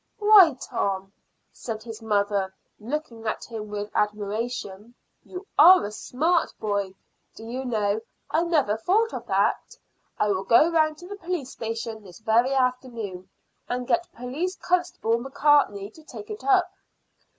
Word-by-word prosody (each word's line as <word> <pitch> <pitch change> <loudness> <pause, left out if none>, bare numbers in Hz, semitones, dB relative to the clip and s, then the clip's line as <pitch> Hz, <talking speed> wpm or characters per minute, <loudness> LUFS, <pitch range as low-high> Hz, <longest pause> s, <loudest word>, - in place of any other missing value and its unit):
"Why, 410 - +7
Tom," 195 -6 -3 0.4
said 220 -2 -6
his 225 -1 -9
mother, 205 -3 0 0.2
looking 230 -1 -5
at 215 - -2
him 220 -3 -7
with 205 0 -5
admiration, 210 +1 -3 0.3
"you 370 +1 -9
are 360 - +8
a 205 - -5
smart 320 +10 0
boy. 200 -3 -2 0.4
Do - - -11
you 255 +3 -5
know, 215 -3 0 0.3
I 320 - +2
never 300 -11 +1
thought 420 - +1
of - - -6
that. - - 0 0.4
I 210 - +1
will 195 -1 0
go 235 - +5
round 310 -2 +2
to 355 - -11
the 405 +1 -7
police 335 -8 -4
station 225 -1 -5
this 185 -4 -13
very 225 +4 +2
afternoon 245 -8 -2 0.4
and 250 0 -2
get 345 0 0
Police 285 +10 -4
Constable 350 -13 0
Macartney 265 -6 +2
to 315 - -17
take 415 +7 -10
it 425 - -7
up." 385 -3 +3
235 Hz, 150 wpm, -25 LUFS, 210-315 Hz, 0.4 s, are